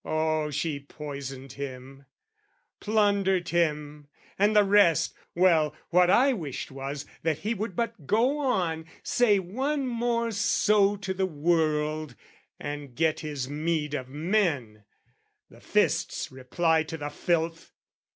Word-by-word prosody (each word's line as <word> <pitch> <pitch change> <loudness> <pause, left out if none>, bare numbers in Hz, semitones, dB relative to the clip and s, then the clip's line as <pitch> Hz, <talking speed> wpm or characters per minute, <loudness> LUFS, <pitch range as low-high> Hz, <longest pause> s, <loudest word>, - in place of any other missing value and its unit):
Oh, 155 -1 0
she 150 0 -2
poisoned 140 -2 -8
him, 135 0 -8 0.7
Plundered 200 -4 +1
him, 150 -3 -1 0.3
and 210 +2 +3
the 210 - +7
rest! 200 -5 +4 0.2
Well, 165 -4 +3 0.2
what 180 0 +5
I 260 +7 +5
wished 155 - -5
Was, 135 +1 -5 0.2
that 160 -2 0
he 210 +9 -2
would 210 -3 -4
but 205 - -3
go 250 +7 +2
on, 175 - 0 0.2
say 230 -4 +3
once 265 +10 -2
more 235 -1 0
So 205 -1 +3
to 195 -1 -4
the 190 0 0
world, 155 -3 0 0.4
and 145 -3 -6
get 160 +1 +1
his 145 -5 -4
meed 150 +1 -2
of 130 -3 -4
men, 145 - -1 0.7
The - - -17
fist's - - 0
reply 160 +6 +1
to 160 +1 -5
the 145 -1 -4
filth. 165 +1 -1
160 Hz, 130 wpm, -27 LUFS, 145-200 Hz, 0.7 s, the